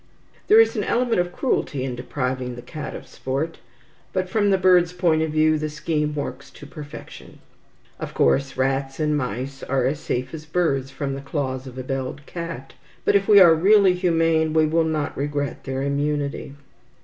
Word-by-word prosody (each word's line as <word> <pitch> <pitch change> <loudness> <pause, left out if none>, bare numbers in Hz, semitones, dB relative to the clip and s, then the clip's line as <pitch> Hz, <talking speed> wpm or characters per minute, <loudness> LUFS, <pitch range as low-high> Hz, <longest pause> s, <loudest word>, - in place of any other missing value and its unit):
There 430 +2 +7
is 455 - +4
an - - -1
element 235 -5 +1
of 175 0 -4
cruelty 155 - -1
in 130 -2 -3
depriving 125 -1 -3
the 120 - -9
cat 150 +3 -7
of - - -8
sport, 140 +5 -4 0.5
but 185 -1 -1
from 205 +2 +1
the 195 - +4
bird's 180 -2 +4
point 170 -3 +2
of 160 - 0
view 155 0 +3
the 155 0 -2
scheme 150 -1 -2
works 140 -1 -5
to - - -13
perfection. 145 0 -10 0.6
Of - - -6
course 135 -1 +2
rats 135 +1 -1
and 150 -1 +1
mice 130 +1 -4
are 130 -1 0
as 140 +3 0
safe 130 -3 -3
as 155 -1 -8
birds 145 -5 0
from 140 0 -4
the 135 - -5
claws 135 -2 -3
of 130 0 -10
a 130 - -4
belled 135 +2 -4
cat, 165 -6 -7 0.3
but, - - +4
if 195 -1 +3
we 205 -2 +8
are 175 -4 +8
really 195 +3 +5
humane, 165 -3 +2
we 160 -1 +4
will 160 +1 +2
not 155 -2 -2
regret 145 0 -3
their 135 0 -3
immunity. 140 0 -2
150 Hz, 185 wpm, -23 LUFS, 135-165 Hz, 0.6 s, we